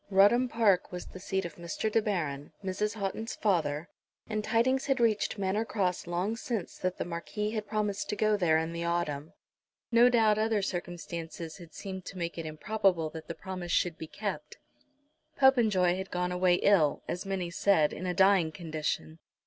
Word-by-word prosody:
Rudham 205 +6 +5
Park 210 -6 +2
was 180 -1 -6
the 185 - -10
seat 190 0 -2
of 170 - -7
Mr. 175 +5 -3
De 225 - +3
Baron, 155 -9 -2
Mrs. 205 +3 -1
Houghton's 220 +2 -3
father, 160 -6 0 0.4
and 215 -1 -2
tidings 260 +5 +2
had 270 -2 +2
reached 220 -2 +2
Manor 200 +2 0
Cross 185 -6 -1
long 180 +6 -1
since 230 -5 -4
that 185 0 -1
the - - -2
Marquis 180 +5 -3
had 215 -2 -3
promised 210 -2 -1
to - - 0
go 215 0 +2
there 170 -5 +3
in 160 +1 -2
the 170 0 -3
autumn. 165 -3 -2 0.6
No 240 +1 +7
doubt 220 -3 +4
other 220 -2 +1
circumstances 170 -3 -5
had 170 -4 -13
seemed 190 -2 -6
to 195 - -8
make 170 -1 -3
it 160 - -4
improbable 170 0 0
that 160 0 -9
the 165 - -5
promise 185 -3 -6
should 175 -2 +2
be 160 - -6
kept. - - -5 0.8
Popenjoy 220 -10 +4
had 190 0 -5
gone 180 0 -1
away 180 0 +3
ill, 175 -6 +3
as 175 - -3
many 185 -3 -2
said, 170 -4 +3
in 185 - -5
a 180 - 0
dying 190 -4 +4
condition. 155 -1 -4
185 Hz, 180 wpm, -30 LUFS, 170-210 Hz, 0.8 s, No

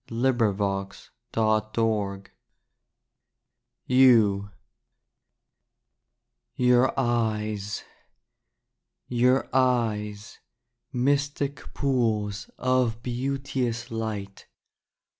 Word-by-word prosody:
DAY 120 +3 +1
DREAMS 100 -4 -2 2.7
YOU 115 -6 +4 2.1
Your 125 +2 +3
Eyes 110 -4 -1 1.2
Your 125 +2 +2
Eyes, 110 -5 0 0.5
Mystic 140 +2 -1
pools 110 -7 0
Of 125 -3 +1
beauteous 125 -1 -2
light. 105 -3 -5
120 Hz, 45 wpm, -26 LUFS, 105-130 Hz, 2.7 s, YOU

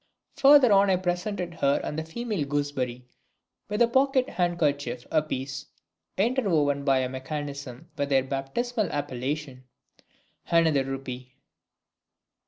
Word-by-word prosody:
Farther 275 -3 +7
on 200 0 +5
I 190 - +4
presented 180 0 -2
her 140 -4 +1
and - - -4
the - - -3
female 205 +1 -3
gooseberry 135 -4 -2 0.6
with 210 +3 +3
a - - +4
pocket 265 +1 +2
handkerchief 145 -8 -1
a 155 - +3
piece, 135 -2 -5 0.5
interwoven 180 - +1
by 135 -2 +3
a 130 - -1
mechanism 140 +1 -6
with 140 0 -2
their 135 -2 +3
baptismal 190 - -2
appellation 135 0 -4 0.8
(another 160 -5 +3
rupee!). 130 -1 -6
145 Hz, 120 wpm, -26 LUFS, 135-190 Hz, 0.8 s, Farther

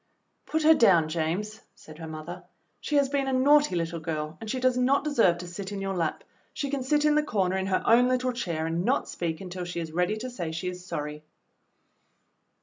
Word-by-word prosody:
"Put 315 0 0
her 320 +1 +8
down, 180 - +4
James," 175 +7 -2
said 155 0 -14
her 165 - -7
mother. 160 +3 -7 0.4
"She 300 - -3
has 280 -1 +4
been 275 0 -1
a 265 - 0
naughty 290 -2 +4
little 165 0 -2
girl 155 -1 -4
and 220 - -6
she 255 - -1
does 255 0 +2
not 255 +3 +2
deserve 230 - +3
to 180 +1 -8
sit 190 +3 -7
in 200 - -4
your 195 0 -3
lap. 165 -3 -2 0.3
She 280 -2 -3
can 280 -2 -1
sit 295 +3 +1
in 300 - +4
the 300 - +4
corner 195 -10 0
in 190 0 -1
her 190 -1 0
own 245 +2 +5
little 255 0 0
chair 170 -9 -3
and 165 +2 -1
not 255 +7 +1
speak 165 -1 -4
until 180 -1 -6
she 175 -1 -5
is 165 -2 -5
ready 180 +6 0
to 255 +3 -6
say 175 -9 -4
she 165 +3 -3
is 180 0 -8
sorry." 150 -4 -5
190 Hz, 225 wpm, -27 LUFS, 170-255 Hz, 0.4 s, her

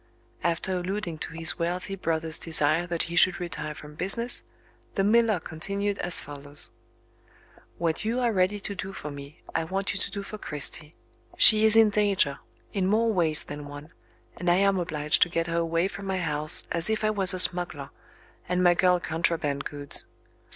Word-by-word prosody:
After 170 +2 -1
alluding 180 -3 -5
to 160 - -6
his 165 +1 0
wealthy 180 +3 -3
brother's 165 -4 -1
desire 165 +1 +2
that 170 -1 -2
he 170 0 -7
should 180 +2 +3
retire 160 -3 -6
from 150 0 -12
business, 195 +9 -2 0.5
the 195 - 0
miller 220 -1 +2
continued 200 +6 -4
as 175 - +1
follows: 145 0 -4 1.1
"What 165 -2 -2
you 230 +4 -2
are 240 -2 0
ready 190 +2 0
to 200 - -4
do 195 0 -7
for 150 -5 -8
me, 140 +1 -12
I - - -1
want 190 +4 -3
you 195 - -4
to - - -4
do 200 -1 -7
for 215 +2 -9
Cristy. 150 0 +1 0.4
She 215 -1 +7
is 220 0 +4
in 225 -2 +5
danger, 200 -9 0 0.3
in 190 -2 -1
more 220 +3 +1
ways 160 -5 +1
than 145 0 -9
one, 145 +2 -12 0.4
and 175 0 -2
I 175 - +4
am 195 0 +1
obliged 150 -3 -1
to 175 - +4
get 165 -1 -2
her 170 0 -3
away 165 +2 -1
from 195 0 -9
my 190 -1 -2
house 155 -3 +5
as 170 +3 +2
if 220 0 -2
I 215 - +1
was 195 -3 +4
a - - -4
smuggler, 175 -6 +4 0.6
and 180 0 0
my 175 -1 +5
girl 180 0 +2
contraband 160 -4 -2
goods. 145 -1 +4
175 Hz, 185 wpm, -25 LUFS, 160-195 Hz, 1.1 s, She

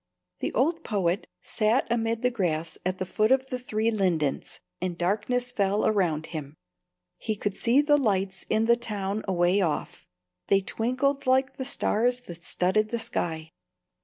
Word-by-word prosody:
The - - -2
old 325 +6 +1
poet 195 -1 0 0.2
sat 220 +3 +1
amid 230 0 0
the 250 - +3
grass 165 -7 -1
at 185 +1 -1
the 185 - -2
foot 215 +5 +1
of 265 0 +4
the 255 - -2
three 225 -2 0
lindens, 175 -9 -1 0.2
and 180 -2 -2
darkness 220 +7 0
fell 205 -3 +1
around 175 -7 +1
him. 150 -2 -6 0.6
He 220 - -2
could 205 -1 -3
see 240 +7 +3
the 295 0 +4
lights 195 -7 0
in 220 +1 +2
the 235 +1 +5
town 210 -3 -3
away 180 +1 +2
off; 165 -5 -2 0.4
they 195 0 +4
twinkled 255 +7 -1
like 260 +1 +2
the 260 - -3
stars 245 -2 +1
that 170 -7 -11
studded 215 +4 +1
the 235 - -1
sky. 160 -7 -3
215 Hz, 160 wpm, -27 LUFS, 185-245 Hz, 0.6 s, the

